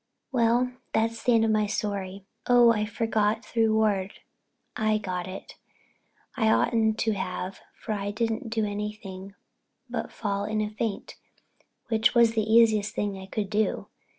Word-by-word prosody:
Well—that's 235 -2 0
the 245 - +3
end 225 0 +4
of 220 - +2
my 215 -1 +2
story. 200 -2 -3 0.2
Oh, 245 -1 +6
I 215 -2 0
forgot 220 0 0
the 230 - +2
reward—I 215 0 -1
got 185 -3 -4
it. 185 +1 -9 0.8
I 225 -4 +2
oughtn't 220 -1 +2
to 225 - +2
have 185 -1 -4 0.2
for 220 - -5
I 200 -1 -2
didn't 225 +3 -2
do 220 -1 0
anything 205 -2 -6 0.5
but 235 -2 -4
fall 200 -2 -2
in 215 +1 -1
a 210 0 -1
faint, 215 -1 -4 0.7
which 225 +1 +2
was 235 -1 +6
the 220 -1 0
easiest 220 -2 +4
thing 200 -2 -2
I 190 - -9
could 200 0 -3
do. 215 0 0
215 Hz, 150 wpm, -27 LUFS, 205-225 Hz, 0.8 s, Oh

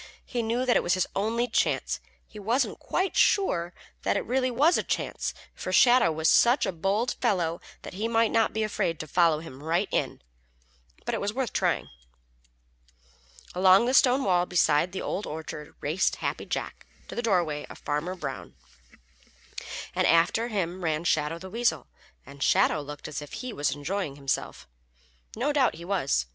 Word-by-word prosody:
He 245 - -2
knew 230 +3 -1
that 245 - +3
it - - +4
was 175 0 +1
his 185 - +1
only 230 +4 0
chance. 225 - 0 0.3
He 210 - -12
wasn't 230 +7 0
quite 380 +1 -1
sure 175 - +2 0.3
that - - +1
it - - -3
really 255 +2 +1
was 290 +8 +3
a - - +2
chance, - - -2 0.2
for - - -5
Shadow 245 -8 +5
was 160 0 0
such 240 - +5
a - - -1
bold 195 +8 0
fellow 170 -3 0 0.2
that - - -8
he 210 +5 -2
might 225 -1 +2
not 225 -1 +2
be 220 - -1
afraid 195 -6 -1
to - - -4
follow 165 -1 +3
him 140 -5 -11
right 165 +3 0
in, - - -2 0.8
but - - -2
it - - -2
was 205 +1 -1
worth 260 -1 -2
trying. - - 0 1.7
Along 190 +4 +5
the 255 - 0
stone 265 0 +5
wall 180 -2 +2
beside 175 -1 +2
the 190 - -5
Old 205 - -3
Orchard 155 -1 -7
raced 160 +7 +1
Happy - - -4
Jack - - -5 0.2
to - - -8
the - - -2
dooryard 175 -10 0
of - - -10
Farmer 150 +6 -3
Brown, 140 -7 -7 1.4
and - - +2
after 175 +8 +3
him 185 -5 -3
ran 160 -1 0
Shadow 155 -1 +1
the 185 +2 -10
Weasel, 235 +1 0 0.4
and 140 0 -13
Shadow 150 - +3
looked 145 0 -8
as 150 -1 -5
if 145 - -10
he 250 -2 -5
was 145 0 0
enjoying 150 +1 -3
himself. 140 -1 -3 0.7
No 275 +6 0
doubt 275 -3 +2
he 170 - -10
was. 175 - 0
185 Hz, 180 wpm, -27 LUFS, 160-230 Hz, 1.7 s, Shadow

